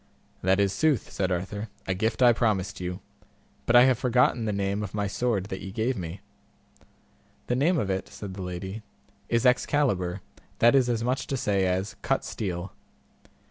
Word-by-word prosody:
That 95 +2 +2
is 100 -1 +2
sooth, 155 -6 +1
said 95 -1 -1
Arthur, 100 +4 -3 0.2
a 95 - 0
gift 110 +6 0
I 120 -1 +7
promised 100 -5 0
you, 90 0 -4 0.7
but 120 - +3
I 120 - +9
have 130 -2 +3
forgotten 125 -2 +2
the 105 - 0
name 100 0 -1
of 105 -1 -5
my 105 -1 0
sword 100 0 0
that 95 - -5
ye 95 - -6
gave 115 +6 0
me. 90 -2 -6 1.2
The 125 - 0
name 160 +7 +2
of 100 -9 0
it, 95 0 -2
said 100 -3 -8
the 95 - -7
lady, 95 +4 -5 0.5
is 115 +1 +1
Excalibur, 125 -8 +2 0.4
that 120 +1 +5
is 130 -3 +4
as 115 -1 0
much 125 +2 -1
to 135 - -2
say 100 -5 +1
as 95 +2 -1
Cut - - 0
steel. 90 -3 -4
105 Hz, 180 wpm, -27 LUFS, 95-120 Hz, 1.2 s, I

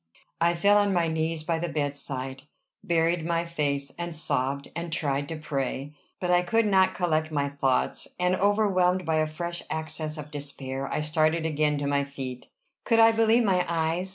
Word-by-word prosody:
I 170 +1 +3
fell 205 +4 +5
on 205 -1 +2
my 170 -2 +2
knees 160 0 -1
by 165 +1 -1
the 175 +1 -2
bedside, 140 -3 -4 0.4
buried 165 0 +1
my 170 +1 0
face, 145 -4 -1
and 170 -1 -4
sobbed, 140 -2 -2
and 170 0 -4
tried 145 -2 -1
to 165 - -3
pray. 145 -2 -3 0.3
But 180 -1 -1
I 175 0 +5
could 225 +6 +2
not 190 -2 +3
collect 160 -3 0
my 140 -2 0
thoughts; 135 -2 0
and, 180 +1 +2
overwhelmed 185 -3 +2
by 160 -1 +1
a 155 0 +2
fresh 170 +2 -4
access 155 0 -4
of 150 0 -8
despair, 135 -2 -5
I - - 0
started 155 +1 +1
again 150 -1 +1
to 145 - -2
my 140 0 +1
feet. 130 -3 -7 0.4
Could 230 - +2
I 225 0 +8
believe 225 +1 +4
my 185 -4 +3
eyes? 165 +2 0
160 Hz, 180 wpm, -27 LUFS, 145-175 Hz, 0.4 s, I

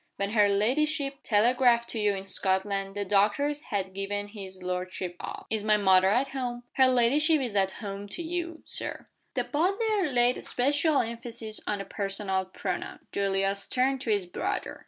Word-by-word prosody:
When 200 0 -2
her 210 -2 +4
ladyship 275 +7 +1
telegraphed 235 +2 +3
to 225 - -3
you 205 -1 +2
in 190 0 -6
Scotland 195 +1 0
the 205 0 -2
doctors 210 +10 +2
had 190 -2 -3
given 205 +1 -3
his 190 -3 -8
lordship 180 0 -3
up." - - -7
"Is 220 -2 0
my 215 0 +4
mother 190 -2 +5
at 255 +7 +2
home?" 245 -3 -4
"Her 260 -1 +5
ladyship 280 +6 +3
is 245 -6 -3
at 190 -1 +2
home 200 -1 -6
to 345 - -4
you,, 335 0 -4
Sir."' - - -3 0.3
The - - +1
butler 390 +3 +1
laid 245 -1 +3
a - - -8
special 285 +4 +2
emphasis 230 -1 -4
on 210 - 0
the 195 - -5
personal 195 -2 -2
pronoun. 185 - -5
Julius 195 0 0
turned 260 +1 +1
to 250 - -4
his 205 -3 +2
brother. 390 - -3
215 Hz, 175 wpm, -28 LUFS, 195-270 Hz, 0.3 s, mother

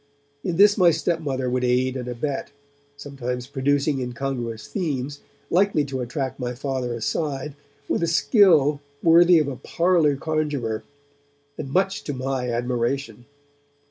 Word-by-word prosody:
In 175 -3 -2
this 205 +1 +6
my 180 -2 +7
stepmother 155 -5 -1
would 125 0 0
aid 125 +1 +1
and 125 -2 -5
abet, 130 +3 -3 0.5
sometimes 125 -4 -5
producing 140 +1 0
incongruous 125 -3 -4
themes, 145 -6 -3 0.3
likely 180 -5 +3
to 135 -2 -4
attract 130 +2 -4
my 125 -1 -3
Father 130 -2 -3
aside, 140 +5 -2 0.3
with - - 0
a 170 - +1
skill 160 - +4 0.2
worthy 170 +1 +7
of 155 -3 +2
a 135 -3 -4
parlour 165 +1 +2
conjurer, 145 -7 -2 0.7
and 135 - -6
much 190 +4 +1
to 145 - -3
my 130 -1 -2
admiration. 120 0 -2
140 Hz, 135 wpm, -23 LUFS, 125-155 Hz, 0.7 s, my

